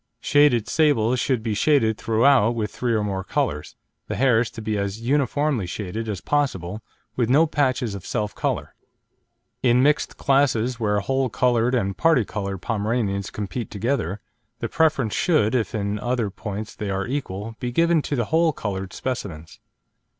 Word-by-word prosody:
Shaded 140 -6 +3
sables 130 -6 +2
should 125 -4 0
be 110 -2 -1
shaded 110 -2 +3
throughout 115 +1 +3
with 105 -3 -2
three 120 -2 -1
or 105 - +1
more 95 -2 -2
colours, 75 -4 -2 0.3
the - - -3
hairs 125 -3 +3
to - - -10
be 110 -1 -2
as 100 +1 -2
"uniformly 140 -2 0
shaded" 105 +4 -4
as 100 -4 -4
possible, 110 - -1 0.3
with 120 -2 0
no 150 +6 +5
patches 130 -7 0
of 100 -3 -7
self 105 -3 -2
colour. - - -2 0.9
In 125 0 +4
mixed 150 +1 +1
classes 130 -4 +2
where 105 -2 +1
whole 135 +4 0
coloured 120 +2 +2
and 100 -5 0
parti 160 -9 +3
coloured 100 -3 -5
Pomeranians 105 -2 -1
compete 105 +3 -5
together, 105 - -2 0.4
the - - -3
preference 150 -9 +1
should, 140 -11 +2
if 115 -4 0
in 100 0 -2
other 120 -3 -1
points 105 +1 -6
they 105 - -5
are 95 0 -1
equal, 115 -5 -4
be 125 -2 -3
given 165 +3 +3
to 145 - -3
the 120 -4 0
whole 160 +4 +2
coloured 95 -5 -4
specimens. 90 -10 -5
115 Hz, 165 wpm, -23 LUFS, 105-135 Hz, 0.9 s, no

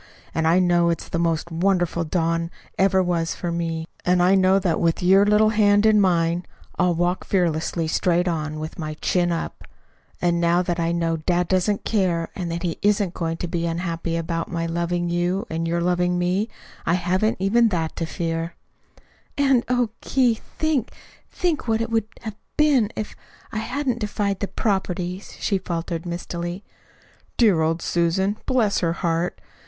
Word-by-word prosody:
And 160 0 +1
I 165 +2 +4
know 175 -2 +3
it's 170 - -2
the 170 - -2
most 165 0 0
wonderful 175 -1 +1
dawn 165 0 0 0.3
ever 190 0 +3
was 170 -2 -1
for 175 - -3
me. 165 -1 -2 0.2
And 180 0 +3
I 185 +2 +5
know 190 0 +4
that 185 -4 0
with 165 +1 +1
your 195 +3 +5
little 210 +1 +5
hand 205 -1 +4
in 215 -1 +5
mine 170 -2 +2 0.4
I'll 180 -1 +3
walk 175 +2 0
fearlessly 165 -2 0
straight 175 +2 +1
on, 155 -3 -2
with 155 +2 -6
my 155 -1 -4
chin 175 +2 +1
up. 165 - -4 0.5
And 175 -1 +1
now 170 +1 +3
that 175 -1 -2
I 165 0 +1
know 165 -1 0
dad 175 +2 0
doesn't 190 +3 +1
care, 180 -6 +1
and 175 -3 -3
that 170 +1 -3
he 170 -2 -2
isn't 205 -3 +2
going 165 -1 -2
to 175 - -3
be 170 -1 -2
unhappy 165 0 -2
about 165 0 -3
my 165 -1 -1
loving 170 +1 -1
you 175 +4 0
and 165 +1 -2
your 170 +1 0
loving 180 0 +1
me, 180 +5 0 0.3
I 170 - +2
haven't 185 +5 +1
even 225 +5 +4
that 165 -5 -2
to 165 - -2
fear." 165 0 -3 0.8
"And, 270 -4 +3
oh, 245 -3 +1
Keith, 245 -4 +1 0.2
think, 310 -7 0 0.4
think 340 -8 -1
what 225 -1 +2
it 230 0 -2
would 225 -2 +1
have 220 -3 -7 0.2
been 295 -7 +4
if 215 - -4
if - - -15 0.4
I 215 - -2
hadn't 250 +1 -2
defied 205 -2 -1
the 200 - -2
'properties,'" 190 -3 -2
she 195 -2 0
faltered 170 -1 -4
mistily. 175 +2 -4 0.7
"Dear 205 -9 +4
old 165 +1 0
Susan 190 +4 +1
bless 235 -6 +2
her 165 -2 0
heart! 170 +1 -1
175 Hz, 175 wpm, -23 LUFS, 170-200 Hz, 0.8 s, I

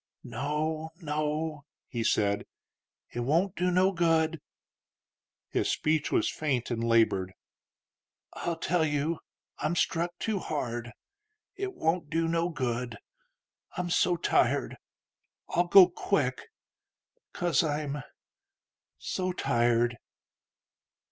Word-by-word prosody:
"No, 155 +2 -2
no," 150 -1 -2 0.2
he 115 -2 -3
said; 100 -2 +1 0.7
"it - - -3
won't 165 - +1
do 180 +1 +1
no 185 +2 +4
good." 165 -3 +2 1.1
His - - 0
speech 155 -1 +1
was - - +2
faint 130 -6 -1
and 115 -1 -1
labored. 110 -5 +2 1.0
"I'll 170 - -2
tell 165 +1 +1
you: 150 +2 0 0.4
I'm 155 +3 0
struck 175 +1 0
too 215 0 -1
hard. 120 -8 -3 0.6
It 390 -1 -4
won't 160 -1 0
do 165 +1 +1
no 165 +1 +1
good. 125 -6 -2 0.8
I'm 175 -1 -2
so 175 +1 +3
tired.... 165 - +1 0.7
I'll 175 +1 +1
go 185 0 +9
quick... 145 -8 -1 0.8
'cause 175 -3 +1
I'm... 145 -2 -2 1.0
so 185 0 -2
tired." 120 -4 +2
155 Hz, 105 wpm, -29 LUFS, 125-170 Hz, 1.1 s, go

